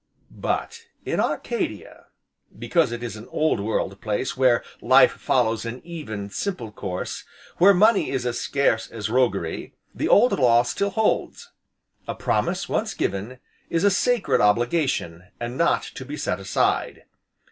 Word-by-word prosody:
But 460 0 -4 0.2
in - - -1
Arcadia 475 - -3 0.5
because 165 -8 +1
it 120 0 -5
is 115 -3 -5
an 110 +1 -10
old 155 -7 0
world 100 -2 -2
place 105 +3 -2
where 125 -2 +3 0.2
life - - +6
follows 110 0 0
an 115 +2 -5
even, 110 -13 -6
simple 125 - -4
course, 95 -3 -5 0.4
where 190 +3 +8
money 215 +5 +4
is 130 -2 -2
as 120 -1 -1
scarce 140 -5 0
as 110 -2 -5
roguery, 100 -10 0 0.2
the - - -2
old 245 +5 +6
law 120 -2 +5
still 200 +10 -1
holds; 215 +2 -1 0.6
a - - -3
promise - - -1
once - - -2
given, 100 +7 -3 0.3
is 165 +1 0
a 200 - +5
sacred 245 +3 +2
obligation, 105 - +1
and 120 +1 -4
not 170 +5 +2
to - - -8
be 145 +3 -7
set 90 - -2
aside. 95 -1 0
120 Hz, 145 wpm, -24 LUFS, 110-170 Hz, 0.6 s, where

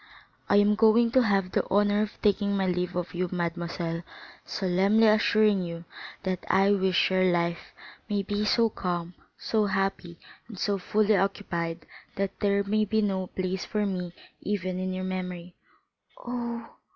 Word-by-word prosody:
"I - - +4
am 205 +1 +5
going 225 +2 +4
to 260 - +5
have 195 -5 +1
the - - +1
honor 205 +1 +3
of 215 -1 -4
taking 200 -1 +2
my 190 - +1
leave 180 -1 -1
of 180 -1 -3
you, 180 0 -2
mademoiselle, 170 -1 -3 0.4
solemnly 195 +4 +2
assuring 215 -2 +4
you 170 -1 -6 0.4
that 185 -1 -2
I 195 +1 +4
wish 190 -2 +2
your 185 0 +3
life 170 0 -1 0.4
may 205 -1 0
be 205 +1 -2
so 230 +2 +3
calm, 175 -2 -3 0.2
so 215 -2 0
happy, 195 -3 -2 0.3
and 220 -4 -10
so 200 +1 0
fully 210 +3 +2
occupied, 170 -4 -2 0.3
that 195 0 -3
there 200 0 +2
may 215 +2 +1
be 215 +1 +1
no 190 -2 -1
place 185 0 -3
for 210 -1 -1
me 180 -3 -3 0.3
even 185 -3 -2
in 185 0 -2
your 185 0 -4
memory." 180 -1 -5 0.6
"Oh!" 235 -1 -5
195 Hz, 160 wpm, -27 LUFS, 180-210 Hz, 0.6 s, am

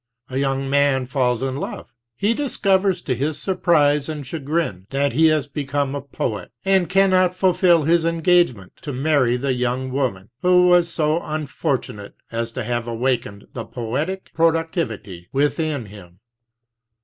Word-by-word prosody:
A 130 - -3
young 135 0 -1
man 140 -1 +2
falls 125 -2 0
in 135 0 -2
love; - - -6 0.2
he 205 - +1
dis 285 +2 +2
covers 190 -2 +2
to 130 - -1
his 145 +5 -1
surprise 150 -5 +2
and 150 -3 -5
chagrin 140 - -3
that 140 0 0
he 160 +5 +5
has 155 -3 +2
become 145 -1 -2
a 140 - -3
poet, 110 -8 -4 0.2
and 190 -2 +3
cannot 185 -1 +3
fulfill 180 -3 +3
his 165 +2 +3
engagement 165 - +1
to 145 - -5
marry 130 -3 +2
the 135 +1 -1
young 125 +1 -2
woman 120 -8 -2
who 180 0 +5
was 175 -1 +4
so 155 0 0
unfortunate 140 -8 -4 0.2
as 115 0 -3
to - - -4
have 120 0 -2
awakened 115 -3 -2
the 115 - -5
poetic 140 +13 -4
pro 165 +1 +4
22 165 0 -2 0.2
ductivity 95 -5 -10
within 145 -1 0
him. 95 -4 -14
140 Hz, 160 wpm, -21 LUFS, 125-165 Hz, 0.2 s, he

